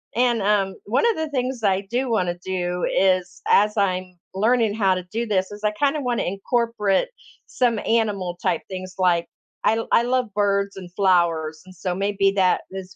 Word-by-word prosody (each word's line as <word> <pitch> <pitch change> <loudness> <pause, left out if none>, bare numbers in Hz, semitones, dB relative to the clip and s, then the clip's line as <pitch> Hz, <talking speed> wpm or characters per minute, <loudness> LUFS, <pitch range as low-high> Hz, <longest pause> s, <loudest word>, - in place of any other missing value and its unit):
and, 240 -2 +2
um, 195 -1 +1
one 245 - +1
of 440 - -6
the 315 -1 -2
things 255 -3 -2
I 195 -1 +2
do 245 +6 -2
want 185 -6 +1
to 175 0 -4
do 180 -1 -2
is 185 -1 +1
as 210 +1 +4
I'm 185 -2 -1 0.2
learning 220 +2 +2
how 195 -4 +2
to 180 - -4
do 230 +1 -2
this, 190 -2 0
is 205 +1 -10
I 210 - +2
kinda 290 +6 0
want 245 -3 -1
to - - -2
incorporate 210 - 0 0.4
some 240 -3 +1
animal 205 -6 0
type 165 - 0
things, 185 0 -7
like, 175 -2 +2 0.4
I 225 +1 +2
I - - +5
love 250 -3 0
birds 200 -1 0
and 180 -2 -9
flowers, 170 -5 +1
and 185 0 -14
so 180 0 -3
maybe 195 0 +1
that 185 -1 +3
is 190 -1 -8
200 Hz, 190 wpm, -23 LUFS, 185-230 Hz, 0.4 s, I